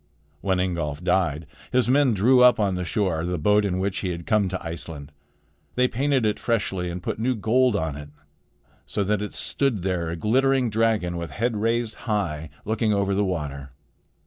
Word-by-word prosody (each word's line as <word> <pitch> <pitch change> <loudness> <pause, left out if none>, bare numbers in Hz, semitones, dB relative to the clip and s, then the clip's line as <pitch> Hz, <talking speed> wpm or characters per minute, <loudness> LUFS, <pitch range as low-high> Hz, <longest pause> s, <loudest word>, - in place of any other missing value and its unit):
When 95 -2 0
Ingolf 85 -4 -2
died, 90 -4 +1 0.3
his 125 -1 +2
men 130 -2 +3
drew 125 +6 +4
up 125 -2 +6
on 100 -3 +1
the 90 0 -2
shore 90 -3 -1
the 90 +1 -2
boat 105 +6 +3
in 95 -3 -1
which 95 +1 -1
he 95 - -2
had 85 -1 -5
come 105 -3 +2
to 95 -1 -5
Iceland. 80 -3 -7 0.6
They 125 0 +3
painted 135 0 +1
it 105 - 0
freshly 95 -6 -1
and 90 +1 -6
put - - -3
new 125 +3 +1
gold 115 +3 +2
on 80 -5 -1
it, 75 0 -9 0.8
so 100 - -1
that 105 +1 0
it 105 - -5
stood 125 -10 0
there 90 -3 -1
a 85 - -3
glittering 130 +5 +2
dragon 110 -6 +1
with 85 -1 -5
head 115 - -1
raised 115 +1 0 0.2
high, 80 -8 -1 0.2
looking 110 0 0
over 100 -1 +1
the 100 +1 +1
water. 70 -8 -4
100 Hz, 190 wpm, -24 LUFS, 85-115 Hz, 0.8 s, up